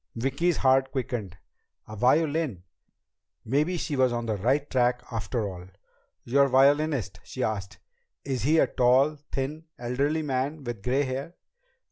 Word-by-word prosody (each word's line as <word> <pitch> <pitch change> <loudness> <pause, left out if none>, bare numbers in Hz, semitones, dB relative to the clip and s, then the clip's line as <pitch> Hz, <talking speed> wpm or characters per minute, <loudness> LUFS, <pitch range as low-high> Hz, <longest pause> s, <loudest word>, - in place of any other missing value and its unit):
Vicki's 140 +8 0
heart 135 0 +3
quickened. 120 -8 -4 0.5
A 110 - -8
violin! 140 - +1 0.8
Maybe 150 +9 +1
she 155 -2 -3
was 130 -2 +3
on 120 0 -2
the 110 -2 -1
right 130 +9 +1
track 125 -2 +1
after 110 -1 -2
all! 90 -2 -8 0.6
"Your 140 +3 +3
violinist?" 135 -6 +2
she 130 - -5
asked. 100 -4 -3 0.5
"Is 135 -3 -2
he 155 +5 +3
a - - +5
tall, 130 +5 +3
thin, 150 +4 -3
elderly 140 +6 -1
man 140 +2 -2
with 120 -4 -5
gray 130 +7 +1
hair?" 135 +6 -4
130 Hz, 140 wpm, -27 LUFS, 120-145 Hz, 0.8 s, a